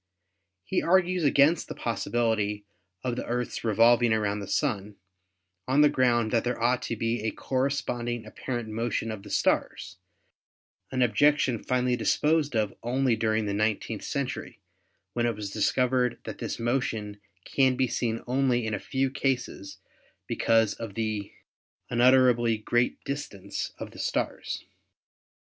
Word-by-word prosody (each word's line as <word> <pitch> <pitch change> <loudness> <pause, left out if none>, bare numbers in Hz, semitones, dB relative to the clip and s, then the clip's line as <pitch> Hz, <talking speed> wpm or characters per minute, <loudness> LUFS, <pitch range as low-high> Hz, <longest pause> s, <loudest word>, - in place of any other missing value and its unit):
He 185 - 0
argued 180 0 +2
against 145 +4 +4
the - - -6
possibility 110 -3 -1 0.4
of 125 -2 -1
the - - -4
Earth's 120 0 -3
revolving 115 +1 +4
around 105 -1 0
the 100 - -6
Sun 100 0 -1 0.7
on 135 +3 +4
the 150 - +7
ground 120 -4 +2
that 115 - +2
there 125 0 -2
ought 125 +2 +2
to 115 - -1
be 115 +2 -1
a 110 - 0
corresponding 120 -3 -2
apparent 120 -3 -5
motion 115 0 -2
of 110 -2 -6
the - - -12
stars, 100 -1 0 0.9
an 130 -1 +2
objection 125 0 +3
finally 125 -1 +1
disposed 150 +1 +1
of 105 -3 +1
only 125 +1 +1
during 110 -1 0
the 100 - -2
nineteenth 110 +1 -1
century, 140 -7 -4 0.5
when 120 0 +1
it 115 - -1
was 105 -1 -6
discovered 125 +2 +1
that - - -7
this - - -3
motion 115 -4 -2 0.2
can 130 -2 +2
be 130 - +2
seen 115 -1 -2
only 125 -2 +1
in 110 - -2
a 105 - -1
few 135 +4 -1
cases 125 -8 -2 0.5
because 115 -2 +2
of 115 -4 -8
the 110 -3 -2 0.6
unutterably 120 -2 +4
great 120 +3 0
distance 105 -9 -5
of - - -7
the - - -13
stars. - - -2
120 Hz, 145 wpm, -27 LUFS, 110-130 Hz, 0.9 s, the